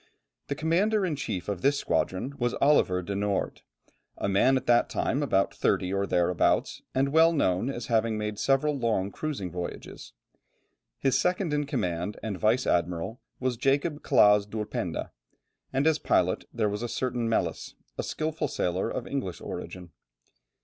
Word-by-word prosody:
The 140 Hz, -, -2 dB
commander 190 Hz, +7 st, +2 dB
in 165 Hz, -5 st, -1 dB
chief 115 Hz, -10 st, -4 dB
of 100 Hz, -3 st, -3 dB
this 140 Hz, +1 st, +3 dB
squadron 95 Hz, -, -1 dB
was 120 Hz, -1 st, 0 dB
Oliver 95 Hz, -11 st, +3 dB
de 100 Hz, -, -4 dB
Noort, 100 Hz, 0 st, -1 dB, 0.6 s
a -, -, -2 dB
man 115 Hz, +7 st, +4 dB
at 130 Hz, -, -4 dB
that 120 Hz, 0 st, +4 dB
time 140 Hz, -, 0 dB
about 100 Hz, -9 st, +1 dB
thirty 95 Hz, +1 st, 0 dB
or 100 Hz, 0 st, 0 dB
thereabouts, 90 Hz, 0 st, +1 dB
and 135 Hz, +1 st, +2 dB
well 160 Hz, +3 st, +5 dB
known 115 Hz, -, +1 dB
as 120 Hz, -4 st, -4 dB
having 115 Hz, -1 st, +1 dB
made 105 Hz, -1 st, -3 dB
several 140 Hz, +2 st, +2 dB
long 110 Hz, -6 st, 0 dB
cruising 130 Hz, -, -4 dB
voyages. 90 Hz, 0 st, -7 dB, 0.8 s
His 135 Hz, -2 st, +2 dB
second 180 Hz, -3 st, 0 dB
in 145 Hz, -1 st, 0 dB
command 90 Hz, -, -2 dB
and 110 Hz, -3 st, -2 dB
vice 115 Hz, +4 st, +2 dB
admiral 90 Hz, +6 st, -1 dB, 0.2 s
was 130 Hz, -2 st, -1 dB
Jacob 145 Hz, +4 st, +1 dB
Claaz 105 Hz, -1 st, +5 dB
d'Ulpenda, 105 Hz, 0 st, -4 dB, 0.6 s
and 135 Hz, +2 st, +1 dB
as 160 Hz, -1 st, +3 dB
pilot 90 Hz, 0 st, +1 dB
there 110 Hz, -3 st, 0 dB
was 105 Hz, +1 st, -3 dB
a 120 Hz, -, -3 dB
certain 125 Hz, -2 st, -1 dB
Melis, 115 Hz, -, -1 dB, 0.2 s
a -, -, -2 dB
skilful 155 Hz, -1 st, -2 dB
sailor 90 Hz, -4 st, -1 dB
of -, -, -4 dB
English 110 Hz, -, -4 dB
origin. 90 Hz, -2 st, -7 dB
115 Hz, 160 wpm, -28 LUFS, 100-140 Hz, 0.8 s, well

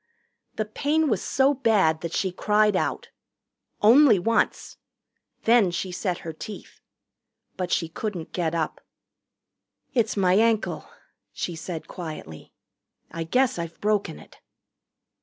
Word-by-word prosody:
The 215 Hz, -, -1 dB
pain 295 Hz, +8 st, 0 dB
was 210 Hz, -6 st, 0 dB
so 270 Hz, +2 st, +2 dB
bad 200 Hz, -, +2 dB
that 170 Hz, -, -4 dB
she 190 Hz, +1 st, -1 dB
cried 210 Hz, +2 st, +2 dB
out. -, -, -2 dB, 0.7 s
Only 240 Hz, +1 st, +7 dB
once. 225 Hz, +6 st, 0 dB, 0.7 s
Then 230 Hz, -4 st, +5 dB
she 180 Hz, +2 st, -3 dB
set 180 Hz, -1 st, -2 dB
her 165 Hz, -, -4 dB
teeth. 205 Hz, +6 st, -10 dB, 0.7 s
But 180 Hz, -1 st, -3 dB
she 165 Hz, -, +1 dB
couldn't 180 Hz, 0 st, -5 dB
get 170 Hz, -2 st, -1 dB
up. 160 Hz, -2 st, -2 dB, 1.1 s
"It's 225 Hz, -5 st, +1 dB
my 185 Hz, -2 st, +3 dB
ankle," 220 Hz, +2 st, +1 dB, 0.4 s
she 175 Hz, -, -4 dB
said 165 Hz, 0 st, -6 dB
quietly. 155 Hz, -, -8 dB, 0.6 s
"I 165 Hz, +1 st, -4 dB
guess 250 Hz, +3 st, +1 dB
I've 170 Hz, -1 st, -6 dB
broken 205 Hz, -6 st, 0 dB
it." -, -, -16 dB
195 Hz, 125 wpm, -25 LUFS, 170-225 Hz, 1.1 s, Only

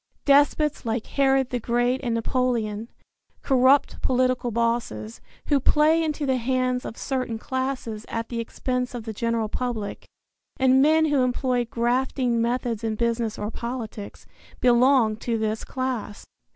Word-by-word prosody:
Despots 290 Hz, +1 st, +3 dB
like 225 Hz, -1 st, -2 dB
Herod 270 Hz, -2 st, +1 dB
the 245 Hz, -, -1 dB
Great 245 Hz, +3 st, 0 dB
and 240 Hz, -4 st, -1 dB
Napoleon, 230 Hz, -2 st, -1 dB, 0.5 s
corrupt 265 Hz, +1 st, +3 dB
political 255 Hz, -1 st, +1 dB
bosses, 230 Hz, -, -2 dB, 0.2 s
who 290 Hz, -2 st, +2 dB
play 310 Hz, +4 st, +3 dB
into 305 Hz, -2 st, -2 dB
the 260 Hz, -1 st, +1 dB
hands 255 Hz, 0 st, 0 dB
of 230 Hz, -, -7 dB
certain 255 Hz, -4 st, -2 dB
classes 260 Hz, -3 st, -3 dB
at 230 Hz, 0 st, -4 dB
the 235 Hz, -, -3 dB
expense 250 Hz, +2 st, -3 dB
of 235 Hz, -, -5 dB
the 220 Hz, 0 st, -5 dB
general 230 Hz, 0 st, -1 dB
public, 225 Hz, -3 st, -4 dB, 0.5 s
and 260 Hz, 0 st, +4 dB
men 315 Hz, +2 st, +4 dB
who 295 Hz, -3 st, +2 dB
employ 250 Hz, -1 st, 0 dB
grafting 240 Hz, +1 st, 0 dB
methods 235 Hz, -1 st, -1 dB
in 220 Hz, -1 st, -1 dB
business 230 Hz, -1 st, -1 dB
or 210 Hz, +1 st, -4 dB
politics, 230 Hz, -4 st, -6 dB, 0.3 s
belong 245 Hz, -2 st, +4 dB
to 230 Hz, 0 st, -2 dB
this 220 Hz, 0 st, -2 dB
class. 255 Hz, -5 st, -4 dB
245 Hz, 140 wpm, -24 LUFS, 230-260 Hz, 0.5 s, and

